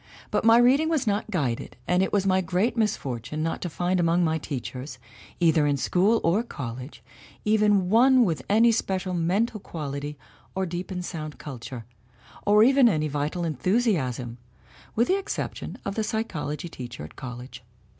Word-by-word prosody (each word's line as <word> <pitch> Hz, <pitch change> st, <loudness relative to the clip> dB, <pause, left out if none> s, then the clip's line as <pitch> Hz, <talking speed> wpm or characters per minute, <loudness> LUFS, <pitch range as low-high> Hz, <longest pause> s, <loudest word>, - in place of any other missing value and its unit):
But -, -, +1 dB
my 225 Hz, +1 st, +7 dB
reading 265 Hz, +6 st, +4 dB
was 310 Hz, -6 st, +1 dB
not 210 Hz, 0 st, -1 dB
guided 140 Hz, -, -2 dB
and 180 Hz, +1 st, +3 dB
it 190 Hz, -, 0 dB
was 200 Hz, -2 st, +1 dB
my 190 Hz, -1 st, +3 dB
great 185 Hz, +7 st, 0 dB
misfortune 150 Hz, -, -2 dB
not 165 Hz, -, -2 dB
to 175 Hz, -, -3 dB
find 180 Hz, +3 st, 0 dB
among 170 Hz, +1 st, +3 dB
my 160 Hz, -1 st, +1 dB
teachers, 130 Hz, -1 st, -6 dB, 0.4 s
either 160 Hz, -3 st, +4 dB
in 145 Hz, -1 st, +1 dB
school 195 Hz, -, +2 dB
or 175 Hz, +7 st, +3 dB
college, 130 Hz, -, -7 dB, 0.4 s
even 210 Hz, -3 st, +3 dB
one 245 Hz, +4 st, +5 dB
with 165 Hz, -5 st, -1 dB
any 225 Hz, +3 st, +5 dB
special 190 Hz, -4 st, -1 dB
mental 195 Hz, +7 st, 0 dB
quality 145 Hz, -4 st, -5 dB, 0.4 s
or 190 Hz, 0 st, 0 dB
deep 175 Hz, +1 st, -5 dB
and 180 Hz, -2 st, -4 dB
sound 155 Hz, -4 st, -6 dB
culture, 125 Hz, -3 st, -8 dB, 0.6 s
or 210 Hz, +1 st, +6 dB
even 265 Hz, 0 st, +6 dB
any 155 Hz, -6 st, 0 dB
vital 150 Hz, +4 st, -2 dB
enthusiasm 150 Hz, -, 0 dB, 0.6 s
with 235 Hz, +2 st, +3 dB
the 385 Hz, +2 st, +2 dB
exception 390 Hz, -, -5 dB
of 200 Hz, -, -2 dB
the 220 Hz, -, -1 dB
psychology 175 Hz, -7 st, -3 dB
teacher 125 Hz, -, -8 dB
at 75 Hz, -, -11 dB
college. 125 Hz, 0 st, -8 dB
180 Hz, 165 wpm, -26 LUFS, 145-215 Hz, 0.6 s, my